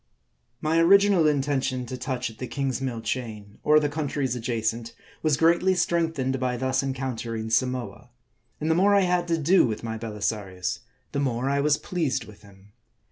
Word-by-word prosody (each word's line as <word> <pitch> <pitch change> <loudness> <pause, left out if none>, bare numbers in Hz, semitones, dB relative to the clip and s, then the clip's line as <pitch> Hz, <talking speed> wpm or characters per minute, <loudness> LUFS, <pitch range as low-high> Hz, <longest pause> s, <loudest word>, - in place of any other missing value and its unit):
MY 160 +2 +2
original 195 -1 +5
intention 135 -3 0
to 130 - -6
touch 125 -2 -3
at 110 - -18
the 125 - -4
Kingsmill 135 -3 -2
Chain, 110 -3 -5
or 150 0 +6
the 150 - 0
countries 145 -4 -2
adjacent, 115 -1 -2 0.3
was 155 -4 +2
greatly 170 +4 +3
strengthened 160 -7 0
by 125 -1 -1
thus 130 +1 0
encountering 120 -4 -4
Samoa; 125 +1 -1 0.5
and 155 +1 0
the - - +5
more 200 +4 +4
I 200 - +5
had 180 -1 +1
to 165 -1 +1
do 170 +2 +4
with 110 -1 -4
my 110 -1 -4
Belisarius, 105 -4 -3 0.3
the 140 - -2
more 130 -1 0
I 140 - +1
was 150 0 +3
pleased 165 -6 -2
with 105 -2 -15
him. 100 0 -18
130 Hz, 170 wpm, -25 LUFS, 115-155 Hz, 0.5 s, or